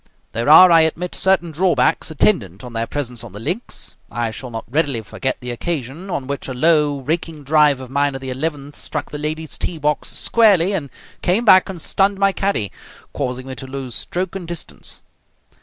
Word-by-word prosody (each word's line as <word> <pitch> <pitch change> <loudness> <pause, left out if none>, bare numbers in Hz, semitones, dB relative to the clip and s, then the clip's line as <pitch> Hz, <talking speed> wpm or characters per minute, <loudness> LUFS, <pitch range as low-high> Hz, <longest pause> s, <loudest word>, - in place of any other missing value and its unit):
There 115 +5 -1
are, 180 +4 +9
I 165 -1 +7
admit, 165 +3 0
certain 190 -3 +2
drawbacks 175 +3 +2
attendant 115 - +1
on 125 -1 -9
their 115 0 -2
presence 125 -5 -4
on 115 -5 -10
the 105 - -8
links. 175 - -4 0.2
I 120 -1 -2
shall 125 +3 -7
not 115 -1 -5
readily 140 -3 0
forget 130 +4 -3
the 125 0 -4
occasion 150 +6 -4
on 140 -7 -3
which 140 +1 -4
a 130 - -5
low, 150 0 +3
raking 155 +1 -3
drive 150 -1 +4
of 130 -1 -9
mine 140 0 +1
at 135 - -6
the 130 -1 -5
eleventh 145 +1 -4
struck 145 -3 -5
the 150 - -5
ladies' 155 +1 -4
tee 170 - -2
box 150 0 0
squarely 205 -5 +4
and 150 -8 -2 0.3
came 200 +7 +1
back 185 -3 +7
and 185 -3 -6
stunned 195 +4 +1
my 195 0 +3
caddie, 195 - -1 0.4
causing 130 -2 -3
me 135 - -6
to 130 +1 -8
lose 130 -2 -6
stroke 180 - -3
and 180 -3 -6
distance. 170 -1 -6
150 Hz, 195 wpm, -20 LUFS, 130-175 Hz, 0.4 s, are